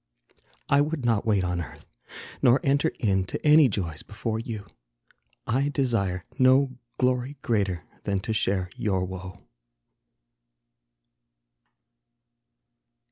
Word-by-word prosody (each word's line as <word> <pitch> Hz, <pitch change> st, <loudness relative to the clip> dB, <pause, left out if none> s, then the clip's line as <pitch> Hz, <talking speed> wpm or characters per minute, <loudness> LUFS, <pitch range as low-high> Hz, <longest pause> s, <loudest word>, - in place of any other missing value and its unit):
I 140 Hz, 0 st, +4 dB
would 145 Hz, -3 st, -2 dB
not 115 Hz, -1 st, +1 dB
wait 100 Hz, -4 st, +3 dB
on 90 Hz, -1 st, -1 dB
earth, 80 Hz, -, -10 dB, 0.6 s
nor 125 Hz, +2 st, +5 dB
enter 140 Hz, +3 st, +2 dB
in 95 Hz, -4 st, +2 dB
To -, -, -6 dB
any 150 Hz, -2 st, +7 dB
joys 85 Hz, -7 st, -3 dB
before 110 Hz, +1 st, -4 dB
you. 110 Hz, -3 st, -6 dB, 0.8 s
I 135 Hz, +5 st, +1 dB
desire 105 Hz, -11 st, 0 dB
No 130 Hz, 0 st, +4 dB, 0.2 s
glory 125 Hz, +2 st, 0 dB
greater 100 Hz, -8 st, 0 dB, 0.2 s
than 100 Hz, -1 st, 0 dB
to 110 Hz, -, -2 dB
share 95 Hz, -3 st, 0 dB
your 95 Hz, -3 st, 0 dB
woe. 95 Hz, +1 st, -8 dB
110 Hz, 110 wpm, -26 LUFS, 95-130 Hz, 0.8 s, any